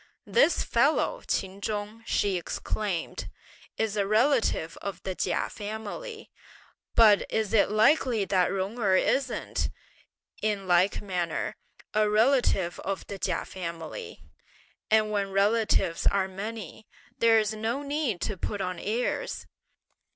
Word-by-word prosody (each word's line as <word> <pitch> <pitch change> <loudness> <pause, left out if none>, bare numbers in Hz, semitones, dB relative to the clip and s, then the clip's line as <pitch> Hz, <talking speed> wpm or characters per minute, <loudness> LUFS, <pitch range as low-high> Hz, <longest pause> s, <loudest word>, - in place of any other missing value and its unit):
"This 470 -7 +3
fellow, 275 +7 +2
Ch'in 190 +1 -2
Chung," 210 +1 -4
she 200 -2 +1
exclaimed, 180 +1 -3 0.5
"is 220 -2 0
a 200 -2 +1
relative 220 - +2
of 200 -4 -5
the 190 - -2
Chia - - -1
family, 220 - -7 0.6
but 215 -3 +7
is 220 -2 -1
it 210 -3 +4
likely 220 0 +3
that 185 -2 +2
Jung 195 +5 -3
Erh 195 -4 +3
isn't, 265 +4 0 0.7
in 205 -3 -1
like 180 +3 +3
manner, 180 -4 -2 0.4
a 215 0 +3
relative 215 -5 +2
of 195 0 -4
the 200 - -7
Chia 180 -3 -1
family; 185 - -7 0.7
and 215 -1 +3
when 200 -2 0
relatives 200 -3 +2
are 195 -1 +3
many, 210 +1 -7 0.3
there's 225 -2 +4
no 225 +6 -2
need 280 - -1
to 205 +2 -2
put 205 +3 -3
on 185 -2 -3
airs! 230 +5 -2
210 Hz, 125 wpm, -28 LUFS, 190-225 Hz, 0.7 s, but